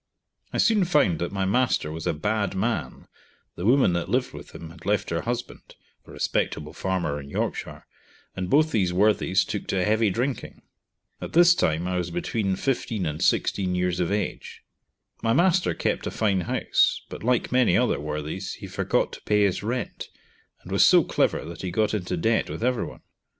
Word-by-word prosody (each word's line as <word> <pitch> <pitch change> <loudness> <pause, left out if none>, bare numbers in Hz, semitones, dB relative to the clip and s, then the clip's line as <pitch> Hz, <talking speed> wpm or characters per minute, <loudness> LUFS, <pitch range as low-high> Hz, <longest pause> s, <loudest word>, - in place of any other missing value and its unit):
I - - -3
soon 215 -4 +4
found 125 - +2
that 85 - -2
my 95 -1 -1
master 105 -6 +1
was 80 +1 -5
a - - +1
bad 100 +4 -1
man, 110 +4 -2 0.5
the 90 - -3
woman 130 -7 +4
that 85 +1 -2
lived 125 +3 0
with 75 -1 -10
him 80 -1 -9
had 85 - -15
left 105 0 0
her 85 0 0
husband 120 +1 -5 0.3
(a - - -12
respectable 75 0 -2
farmer 85 -6 -2
in 70 - -11
Yorkshire), - - -4 0.5
and 90 -1 -3
both 155 +3 +4
these 95 -5 +1
worthies 95 -1 +2
took 105 - -5
to 90 -2 0
heavy 110 0 +2
drinking. 120 +5 -3 0.6
At - - -6
this 175 +1 +7
time 80 - 0
I 90 0 -1
was 90 -1 -2
between 95 +3 -1
15 115 -4 -2
and 75 -1 -3
16 95 -2 +1
years 90 -1 0
of 90 +1 0
age. 105 0 -4 0.6
My 115 - +2
master 180 +3 +3
kept - - -1
a - - 0
fine 100 -4 0
house, 85 - +1
but - - -9
like 125 +1 +1
many 125 0 +4
other 125 -1 +1
worthies, 75 +5 -4
he - - -9
forgot - - 0
to - - -9
pay 105 -1 +2
his 100 -3 +1
rent, 120 +4 -4 0.5
and - - -11
was - - +4
so - - +6
clever - - 0
that 85 +1 -8
he 95 - -3
got 105 +5 0
into 90 -3 -2
debt 110 +7 +1
with - - -5
everyoue. 125 -2 -2
100 Hz, 185 wpm, -25 LUFS, 90-115 Hz, 0.6 s, this